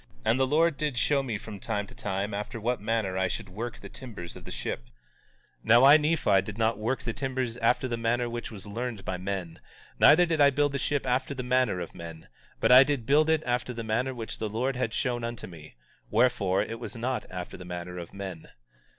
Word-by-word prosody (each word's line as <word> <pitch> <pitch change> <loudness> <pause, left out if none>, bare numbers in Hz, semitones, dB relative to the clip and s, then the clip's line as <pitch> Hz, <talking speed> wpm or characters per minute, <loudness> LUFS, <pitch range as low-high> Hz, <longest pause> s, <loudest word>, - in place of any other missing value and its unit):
And 120 - +3
the 130 - +3
Lord 155 +2 +3
did 150 -5 -2
show 140 +3 +2
me 120 -6 -3
from 105 -1 -9
time 105 -1 -2
to - - -15
time 100 +1 -3
after 105 +3 -4
what 120 +2 -1
manner 105 -4 -1
I 95 - +2
should 100 +1 -5
work 115 +5 -6
the - - -10
timbers 110 -10 -9
of - - -11
the - - -8
ship. - - -4
18:2 - - -27 0.7
Now 120 +3 +6
I, 140 +3 +9
Nephi, 150 - +2
did 105 +2 -8
not 110 -1 +1
work 120 +4 -1
the 115 -1 -2
timbers 130 -3 -2
after 125 +3 +2
the 120 -1 -2
manner 120 +1 0
which 120 0 -5
was 105 -3 -10
learned 115 0 -5
by 95 - -2
men, 90 -3 -4 0.4
neither 165 +4 +7
did 165 -3 0
I 140 - +8
build 145 +1 +1
the 140 - -2
ship 145 +1 0
after 130 +2 0
the 130 - -4
manner 125 -6 +1
of 85 - -6
men; 80 -1 -10 0.3
but 115 - +3
I 130 +2 +10
did 135 -4 -2
build 150 +5 +4
it 160 -1 +2
after 125 0 -1
the 115 -1 -5
manner 120 +4 -1
which 115 -2 -6
the 110 - -2
Lord 125 +5 -1
had 125 -3 -1
shown 120 -3 -1
unto 115 0 -4
me; 80 -6 -12 0.3
wherefore, 110 -5 +2
it 115 0 -6
was 120 - -7
not 125 +2 -2
after 90 -1 -6
the - - -9
manner 90 0 -6
of 85 - -8
men. 95 -4 -7
115 Hz, 230 wpm, -28 LUFS, 100-130 Hz, 0.7 s, I